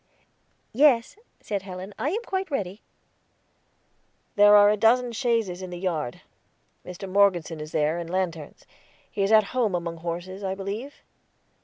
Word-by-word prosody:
"Yes," 250 Hz, -2 st, +3 dB, 0.3 s
said 200 Hz, -2 st, -3 dB
Helen, 190 Hz, +1 st, -8 dB
"I 285 Hz, -, 0 dB
am 435 Hz, +8 st, -2 dB
quite 380 Hz, -3 st, -3 dB
ready." 205 Hz, -, -4 dB, 1.5 s
"There 205 Hz, 0 st, +7 dB
are 205 Hz, 0 st, +7 dB
a -, -, +2 dB
dozen 240 Hz, +3 st, +3 dB
chaises 225 Hz, -7 st, -1 dB
in 185 Hz, -, -6 dB
the 175 Hz, -, -7 dB
yard; 160 Hz, -9 st, -3 dB, 0.6 s
Mr. 180 Hz, +2 st, -8 dB
Morgeson 185 Hz, -5 st, +2 dB
is 155 Hz, 0 st, -8 dB
there, 155 Hz, +3 st, 0 dB
and 170 Hz, -1 st, -6 dB
lanterns. 170 Hz, -5 st, -4 dB, 0.5 s
He 200 Hz, -, -3 dB
is 195 Hz, +2 st, +1 dB
at 215 Hz, -1 st, +7 dB
home 230 Hz, -7 st, +1 dB
among 170 Hz, -1 st, -4 dB
horses, 175 Hz, +4 st, -6 dB
I 190 Hz, 0 st, -2 dB
believe." 205 Hz, +8 st, -6 dB
195 Hz, 150 wpm, -25 LUFS, 175-225 Hz, 1.5 s, There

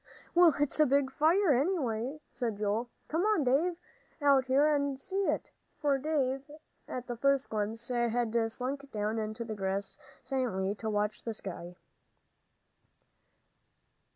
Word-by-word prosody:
"Well, 345 Hz, -2 st, +6 dB
it's 290 Hz, +1 st, +2 dB
a 305 Hz, -, +6 dB
big 275 Hz, 0 st, +2 dB
fire, 320 Hz, +4 st, +4 dB
anyway," 270 Hz, -, 0 dB
said 235 Hz, -4 st, -3 dB
Joel. 215 Hz, +3 st, -1 dB, 0.2 s
"Come 325 Hz, +3 st, 0 dB
on, 420 Hz, -5 st, +2 dB
Dave, 295 Hz, +8 st, +2 dB, 0.4 s
out 280 Hz, -3 st, +4 dB
here 270 Hz, +3 st, +4 dB
and 280 Hz, -2 st, 0 dB
see 390 Hz, +7 st, -2 dB
it," -, -, -1 dB, 0.3 s
for 285 Hz, -3 st, +2 dB
Dave, 275 Hz, -2 st, -1 dB, 0.4 s
at 250 Hz, -1 st, -5 dB
the 240 Hz, -, -4 dB
first 275 Hz, +2 st, +2 dB
glimpse, 220 Hz, +2 st, -2 dB
had 240 Hz, -1 st, 0 dB, 0.2 s
slunk 275 Hz, +4 st, -4 dB
down 215 Hz, +1 st, -1 dB
on 215 Hz, 0 st, -3 dB
the 225 Hz, 0 st, -5 dB
grass 195 Hz, -1 st, -3 dB, 0.2 s
silently 220 Hz, -8 st, -1 dB
to 220 Hz, +1 st, -4 dB
watch 210 Hz, 0 st, -1 dB
the 225 Hz, -2 st, -4 dB
sky. 180 Hz, -3 st, -7 dB
255 Hz, 140 wpm, -31 LUFS, 220-285 Hz, 0.4 s, Well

